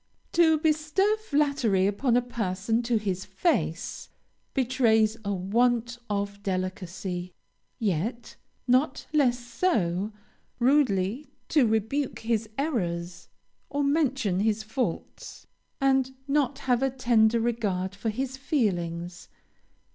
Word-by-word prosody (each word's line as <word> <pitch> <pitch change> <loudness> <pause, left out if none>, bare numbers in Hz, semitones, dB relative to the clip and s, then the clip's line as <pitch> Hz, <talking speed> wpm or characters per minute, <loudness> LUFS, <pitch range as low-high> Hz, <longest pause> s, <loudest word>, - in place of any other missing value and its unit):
To 320 -2 +5
bestow 315 +6 +2
flattery 280 - +1
upon 235 +5 +2
a 245 - +2
person 225 -1 -1
to 235 -1 +1
his 190 -3 -2
face, 190 - -1 0.5
betrays 230 -5 +3
a 200 - -2
want 235 +5 +1
of 200 0 -2
delicacy; 185 -1 -4 0.4
yet, 225 +3 -2 0.3
not 260 +3 +2
less 260 -5 +3
so, 225 - 0 0.5
rudely 245 -2 +2 0.2
to 285 -7 +4
rebuke 220 +6 0
his 225 -1 -1
errors 180 - -2 0.4
or 285 0 -1
mention 270 - +1
his 215 +1 +1
faults, 225 +4 -4 0.3
and 265 -1 +2
not 280 -2 +1
have 250 -1 +2
a 270 - +2
tender 235 -3 +3
regard 205 -5 -1
for 210 +3 -3
his 260 +4 -3
feelings. 175 - -2
230 Hz, 110 wpm, -27 LUFS, 195-270 Hz, 0.5 s, To